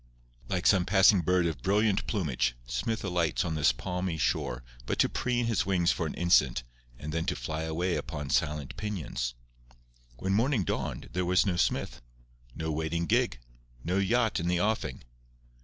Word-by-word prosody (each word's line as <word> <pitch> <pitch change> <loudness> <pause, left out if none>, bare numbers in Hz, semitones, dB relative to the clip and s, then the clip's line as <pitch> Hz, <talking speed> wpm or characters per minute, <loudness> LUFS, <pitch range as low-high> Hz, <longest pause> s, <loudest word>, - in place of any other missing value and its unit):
Like 95 -1 -1
some 95 -3 +5
passing 95 0 +5
bird 90 +1 +2
of 80 -7 -2
brilliant 105 - +2
plumage, 65 - 0
Smith 65 - -2
alights 90 -3 0
on 80 - -2
this 75 -2 +4
palmy 90 -2 -3
shore 65 -4 -1 0.2
but - - -1
to - - +4
preen 120 -1 0
his 115 -2 +1
wings 90 -3 +3
for 85 - -1
an - - -5
instant 70 -8 +3 0.3
and 75 +1 -6
then 80 0 0
to - - 0
fly 80 +6 -4
away 85 +3 -1
upon 75 -3 -5
silent 75 +2 0
pinions. 80 - -3 0.8
When 95 +8 -1
morning 115 +1 +2
dawned - - -3
there 90 0 0
was 90 +1 +3
no 95 -3 +1
Smith, 85 - -1 0.5
no 80 0 -3
waiting 80 +2 -1
gig, - - +1 0.4
no 90 +3 0
yacht 110 +3 +2
in 85 - -2
the 90 0 +1
offing. 105 - -1
85 Hz, 170 wpm, -29 LUFS, 75-95 Hz, 0.8 s, some